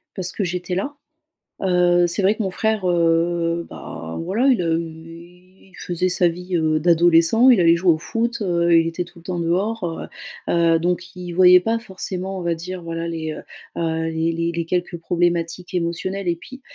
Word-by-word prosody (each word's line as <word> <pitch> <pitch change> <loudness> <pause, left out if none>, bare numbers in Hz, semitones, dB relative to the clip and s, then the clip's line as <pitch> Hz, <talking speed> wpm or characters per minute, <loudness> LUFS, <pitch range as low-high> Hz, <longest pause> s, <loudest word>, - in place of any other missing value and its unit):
Parce 185 -2 -2
que 205 - -3
j'étais 180 0 -3
là. 280 +10 -3 0.7
Heu, 175 -1 +3
c'est 180 +4 -1
vrai 200 +3 +4
que 220 - -3
mon 190 - -2
frère, 215 -1 0
heu, 170 0 +1
bah 80 0 -8
voilà, 215 +10 +1
il 235 -9 +3
a 165 - 0
eu 165 +1 -7 0.4
il - - -17
faisait 180 +1 -1
sa 180 0 +2
vie, 180 +1 -2
heu, 155 -1 +1
d'adolescent, 170 +7 +4
il 235 -7 +6
allait 170 0 +5
jouer 175 0 +3
au 155 - -1
foot, 230 +6 -2
heu, 170 -2 +2
il 165 0 +3
était 175 +2 -3
tout 175 0 -16
le - - -23
temps 180 -1 -3
dehors, 185 +5 -1 0.7
heu - - +1
heu, 165 -1 +3
donc 180 +1 -2
il 180 -1 -7
voyait 180 0 +7
pas 225 +4 0
forcément 190 -3 -5
on - - -5
va 170 -1 0
dire 180 +2 -7
voilà 165 0 -4
les, 160 -2 -4
heu - - -8 0.4
heu, 160 0 -1
les 160 +1 -1
les 165 +1 -1
les 170 0 -2
quelques 175 0 -2
problématiques 175 +1 -1
émotionnelles 180 +3 -2
et 170 - +1
puis 260 +9 -12
175 Hz, 200 wpm, -21 LUFS, 165-185 Hz, 0.7 s, voyait